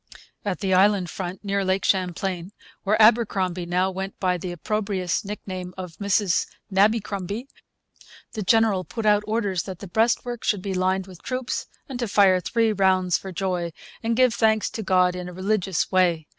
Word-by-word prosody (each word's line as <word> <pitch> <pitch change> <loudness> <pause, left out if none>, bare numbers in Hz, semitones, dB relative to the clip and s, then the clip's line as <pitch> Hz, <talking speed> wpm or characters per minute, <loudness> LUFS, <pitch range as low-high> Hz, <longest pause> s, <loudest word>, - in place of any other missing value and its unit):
At 200 -2 -3
the 195 -2 0
inland 190 -1 +3
front, 185 +1 -6
near 200 0 0
Lake 190 +1 0
Champlain, 185 0 -1 0.3
where 215 +2 +1
Abercromby 195 -6 +3
now 180 +2 +1
went 190 +1 -6
by 180 -1 +1
the 180 0 -5
opprobrious 195 -1 -2
nickname 185 -3 -6
of 180 -4 -7
'Mrs 200 -1 +1 0.3
Nabbycrumby,' 205 +1 +1 0.9
'The 215 - -4
General 215 -2 +3
put 225 +4 -6
out 210 -1 +5
orders 205 -5 0
that 190 -3 -7
the 200 - -9
breastwork 230 +4 0
should 200 -4 0
be 195 - -2
lined 185 +1 0
with 185 -3 -13
troops, 255 0 -3 0.2
and 260 -3 -6
to 240 - -1
fire 195 -2 +4
three 225 +4 +1
rounds 185 -3 +2
for 190 - -8
joy, 180 -2 -2 0.3
and 230 0 0
give 255 -2 +4
thanks 220 -2 +2
to 225 - -5
God 185 -2 +3
in 180 0 -5
a - - -10
Religious 190 -1 -1
Way.' 175 -4 +2
190 Hz, 170 wpm, -24 LUFS, 185-215 Hz, 0.9 s, out